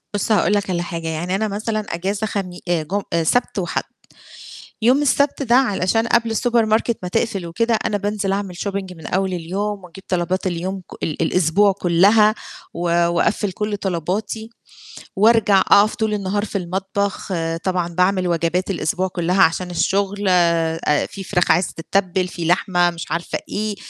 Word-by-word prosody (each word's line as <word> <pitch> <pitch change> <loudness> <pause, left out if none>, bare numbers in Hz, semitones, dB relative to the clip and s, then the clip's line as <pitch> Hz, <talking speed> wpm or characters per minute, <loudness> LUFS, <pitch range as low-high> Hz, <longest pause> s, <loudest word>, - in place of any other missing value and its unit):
بُص، 205 +2 -1
هاقول 210 -1 +3
لك 200 -1 0
على 175 -1 -1
حاجة 165 -1 -5
يعني 165 +4 -2
أنا 215 +2 0
مثلًا 215 +2 -2 0.2
أجازة 200 +5 -2
خمي 185 -3 -4
آآ 170 -2 +1
جم 195 +7 -2
آآ 170 -1 +2
سبت 240 +5 +1
وحَد. 175 - -2 1.0
يوم 255 +6 +4
السبت 285 0 +2
ده 240 -3 +2
علشان 225 -3 +2
قبل 230 -1 +2
الsupermarket 230 -1 +2
ما 180 - -3
تقفل 200 -3 -1
وكده 230 +8 0
أنا 210 - 0
بانزل 205 -1 -2
أعمل 195 -2 -3
shopping 195 -1 -4
من 160 - -10
أول 190 0 -1
اليوم 195 +4 -3
وأجيب 180 +2 -13
طلبات 180 +1 -1
اليوم 185 +2 -3
كُ 180 - -14
ال 155 0 -2
الأسبوع 180 +4 +3
كُلّها 200 +4 +4 0.4
و - - -6 0.3
وأَقفّل 180 +3 0
كُلّ 210 +2 -2
طلباتي 200 +4 -3 0.7
وأرجع 210 -1 +4
أقف 210 +2 +4
طول 220 -3 -1
النهار 205 0 -1
في 205 - -3
المطبخ، 195 +3 -3
آآ 165 -2 -1
طبعًا 180 0 -1
باعمل 185 +1 +2
وجبات 170 +2 0
الأسبوع 180 +1 -1
كُلّها 180 +1 0
عشان 180 +3 +1
الشغل 200 +3 0
ا 165 -3 +2
في 195 - -8
فراخ 180 -2 +1
عايزة 175 +2 +1
تتّبل، 185 +2 0
في 170 -1 -6
لحمة، 175 +1 +2
مش 170 -3 -8
عارفة 170 +1 -2
إيه، 210 0 -2
190 Hz, 165 wpm, -20 LUFS, 175-210 Hz, 1.0 s, يوم